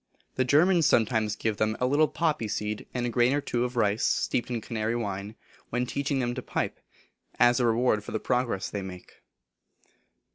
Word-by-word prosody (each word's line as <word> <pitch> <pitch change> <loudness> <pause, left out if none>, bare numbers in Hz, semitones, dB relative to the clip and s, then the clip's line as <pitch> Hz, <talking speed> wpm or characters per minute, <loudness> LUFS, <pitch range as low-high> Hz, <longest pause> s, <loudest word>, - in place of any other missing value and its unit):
The 130 - +1
Germans 165 +5 +4
sometimes 110 -2 +2
give 110 -2 -2
them 110 0 0
a 125 - +1
little 145 +4 +3
poppy 155 -10 -1
seed, 105 0 -3
and 125 -1 -2
a - - 0
grain 120 +2 +3
or 145 - +2
two 120 -4 -1
of 125 0 -5
rice, 105 -1 +2
steeped 120 - 0
in 120 -2 -2
Canary 110 +1 -2
wine, 100 -2 -4 0.3
when 125 +1 -1
teaching 140 +2 -2
them 120 -2 -1
to 125 - -5
pipe, - - -3 0.6
as 120 +1 +5
a 120 - +3
reward 115 -2 +2
for - - -8
the 110 - -1
progress 125 -6 -1
they 100 - -4
make. 90 -1 -10
120 Hz, 190 wpm, -27 LUFS, 110-130 Hz, 0.6 s, as